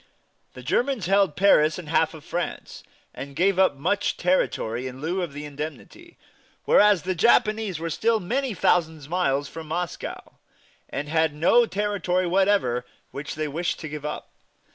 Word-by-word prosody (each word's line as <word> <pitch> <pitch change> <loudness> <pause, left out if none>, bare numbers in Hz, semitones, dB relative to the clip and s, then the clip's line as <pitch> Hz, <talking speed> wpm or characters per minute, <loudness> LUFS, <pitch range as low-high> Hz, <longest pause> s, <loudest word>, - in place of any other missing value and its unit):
The 125 - -10
Germans 245 - 0
held 195 -3 +2
Paris 160 -5 +4
and 180 -4 -8
half 160 +1 +1
of 155 -1 -13
France, 175 0 -5 0.3
and 140 +2 -8
gave 190 +3 +2
up 190 -6 +4
much 180 +9 -1
territory 130 -9 0
in 130 0 -8
lieu 175 +6 -2
of 175 -4 -3
the 145 +1 -7
indemnity, 150 - -8 0.5
whereas 205 -5 +5
the 185 - -1
Japanese 215 -1 +2
were 165 +1 -4
still 225 +6 +1
many 245 +5 -2
thousand 160 -4 +1
miles 145 -5 0
from 160 +1 -9
Moscow, 170 0 -5 0.5
and 145 - -4
had 160 -1 +1
no 230 +10 +4
territory 195 -3 -1
whatever 185 -9 +2 0.3
which 140 +1 -6
they 155 0 -2
wished 165 +4 -2
to 160 - -5
give 150 -1 -7
up. 150 - -6
170 Hz, 160 wpm, -24 LUFS, 150-195 Hz, 0.5 s, whereas